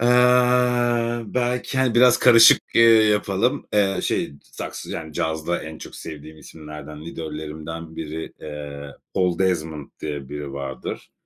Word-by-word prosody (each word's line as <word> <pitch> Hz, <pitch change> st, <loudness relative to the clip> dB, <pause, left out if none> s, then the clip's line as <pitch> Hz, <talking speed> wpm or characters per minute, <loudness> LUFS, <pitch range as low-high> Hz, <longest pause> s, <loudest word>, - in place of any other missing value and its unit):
Eee, 125 Hz, -1 st, +3 dB
belki, 125 Hz, +3 st, -2 dB
hani, 130 Hz, -3 st, +2 dB
biraz 125 Hz, 0 st, +6 dB
karışık, 115 Hz, -2 st, +7 dB
eee, 115 Hz, -, +6 dB, 0.2 s
yapalım. 105 Hz, +5 st, +1 dB
Eee, 95 Hz, -3 st, +2 dB
şey, -, -, -1 dB
saks -, -, -8 dB
yani, 80 Hz, -1 st, -6 dB
cazda 80 Hz, +2 st, -2 dB
en 80 Hz, 0 st, -8 dB
çok -, -, -10 dB
sevdiğim 75 Hz, 0 st, -9 dB
isimlerden, 75 Hz, -1 st, -10 dB
idollerimden 80 Hz, 0 st, -7 dB
biri, 80 Hz, +1 st, -6 dB
eee, 75 Hz, -1 st, -8 dB, 0.2 s
Oldezment 85 Hz, -5 st, -1 dB
diye 70 Hz, -3 st, -5 dB
biri 75 Hz, -1 st, -6 dB
vardır. 70 Hz, -1 st, -6 dB
80 Hz, 125 wpm, -22 LUFS, 75-120 Hz, 0.2 s, karışık